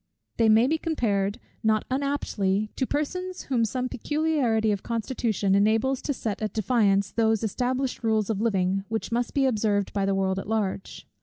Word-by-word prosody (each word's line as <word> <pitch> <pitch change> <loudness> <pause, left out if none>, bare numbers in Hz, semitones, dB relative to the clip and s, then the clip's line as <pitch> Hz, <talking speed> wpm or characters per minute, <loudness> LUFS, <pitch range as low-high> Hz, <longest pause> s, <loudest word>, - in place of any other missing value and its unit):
They 225 -1 +4
may 220 +2 +6
be 315 +4 +1
compared, 205 - -1 0.2
not 220 -1 +2
unaptly, 215 -7 -1
to 260 - -1
persons 365 +5 -3
whom 250 -4 0
some 250 +3 -1
peculiarity 255 -5 0
of 200 -2 -1
constitution 225 -4 -1
enables 225 +6 +2
to - - -2
set 220 -7 -3
at 215 -2 -2
defiance 200 -3 +2
those 225 -1 +1
established 250 +4 -1
rules 220 -1 +1
of 210 -1 -2
living, 195 -3 +1
which 225 +1 -3
must 240 +3 -1
be 275 -1 +3
observed 210 -5 0
by 195 -1 0
the 195 - +1
world 190 0 0
at 195 - -7
large. 205 -3 -2
220 Hz, 170 wpm, -26 LUFS, 200-255 Hz, 0.2 s, may